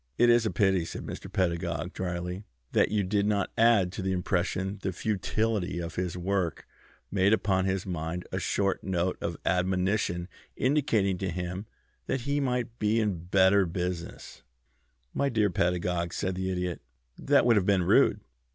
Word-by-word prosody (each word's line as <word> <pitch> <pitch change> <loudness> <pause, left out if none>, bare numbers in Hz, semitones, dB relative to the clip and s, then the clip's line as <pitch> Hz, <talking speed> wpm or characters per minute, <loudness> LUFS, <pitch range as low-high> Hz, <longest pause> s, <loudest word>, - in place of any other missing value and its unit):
"It 120 0 +6
is 120 -1 +4
a - - +1
pity," 95 -4 +2
said 80 - -6
Mr. - - -7
Pedagog, 85 -1 -1
dryly, 90 +1 -4 0.3
"that - - +3
you 105 0 +1
did 100 +2 +1
not 100 -2 0
add 115 -6 +4
to 95 - -5
the 95 0 -1
impression 95 +2 -1
the 95 - -1
futility 105 0 -1
of 85 -1 -4
his 90 -1 -3
work 90 -2 -1 0.5
made 100 +1 +3
upon 95 -4 +1
his 95 -1 -1
mind 85 -1 -4
a - - -1
short 100 -1 0
note 90 -1 0
of - - -3
admonition 90 0 0 0.3
indicating 115 -9 +1
to 95 - -2
him 90 +4 -4 0.4
that 135 - -1
he 140 +3 0
might 125 -3 -2
be 110 +2 +2
in 95 -6 -1
better 95 +1 +4
business." 90 0 -5 0.7
"My 140 - +1
dear 110 -5 +2
Mr. - - -15
Pedagog," 90 -2 0
said 95 -1 -1
the 95 +1 -2
Idiot, 90 -2 -2 0.4
"that - - +3
would 120 -1 +5
have 100 -3 +2
been 100 -3 +3
rude. - - +4
95 Hz, 170 wpm, -28 LUFS, 90-105 Hz, 0.7 s, It